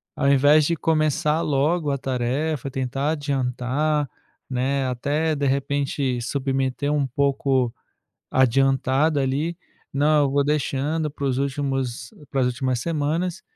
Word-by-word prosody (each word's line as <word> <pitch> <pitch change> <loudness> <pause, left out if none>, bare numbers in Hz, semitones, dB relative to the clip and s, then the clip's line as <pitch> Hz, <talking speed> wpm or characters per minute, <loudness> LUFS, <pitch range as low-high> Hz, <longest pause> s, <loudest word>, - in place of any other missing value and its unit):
ao 140 - 0
invés 145 +2 +5
de 170 - +1
começar 155 0 +1
logo 150 +2 +1
a 140 - 0
tarefa, 135 +3 -2
tentar 135 +2 -1
adiantar, 140 0 -1 0.4
né, 130 +1 0
até 150 +5 0
de 140 0 -1
repente, 140 -1 0
submeter 135 +2 -1
um 145 -2 +1
pouco 135 -2 +1 0.6
adiantado 135 +3 +2
ali, 150 +6 -1 0.4
não, 150 +1 +3
eu - - 0
vou 140 0 +2
deixando 150 +1 0
para 140 -1 -8
os 130 -1 0
últimos 135 -4 -2 0.2
para 135 -1 0
as 125 - +3
últimas 125 0 -1
semanas 165 +2 -1
140 Hz, 130 wpm, -23 LUFS, 130-150 Hz, 0.6 s, invés